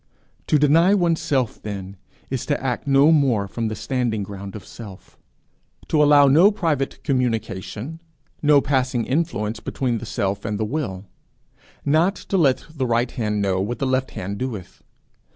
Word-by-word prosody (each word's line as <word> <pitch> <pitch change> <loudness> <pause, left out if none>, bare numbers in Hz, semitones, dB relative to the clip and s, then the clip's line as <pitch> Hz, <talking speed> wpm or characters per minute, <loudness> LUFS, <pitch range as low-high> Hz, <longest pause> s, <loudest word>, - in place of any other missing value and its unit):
To 150 - +4
deny 165 +7 +4
oneself 160 - 0
then, 100 -2 -6 0.4
is 130 -3 -2
to 145 - 0
act 130 0 -3
no 140 +3 +5
more 130 -10 +2
from 115 +3 -3
the 110 - -3
standing 120 -6 -1
ground 100 0 -8
of 105 - -9
self; 100 -5 -12 0.7
to 150 - +3
allow 145 -1 +6
no 155 +9 +6
private 165 -10 -2
communication, 125 - -2 0.4
no 150 -2 +5
passing 130 -4 0
influence 130 -8 -1
between 120 -4 -2
the - - -8
self 100 0 -2
and 105 -2 -3
the 110 - 0
will; 105 -8 -4 0.8
not 160 +7 +3
to 195 - -3
let 135 -6 +2
the 135 -5 -2
right 120 +1 +1
hand 105 -3 -1
know 95 -1 +1
what 115 +5 -3
the 135 - -2
left 130 0 0
hand 100 +2 -6
doeth. 115 -8 -6
130 Hz, 160 wpm, -22 LUFS, 105-145 Hz, 0.8 s, allow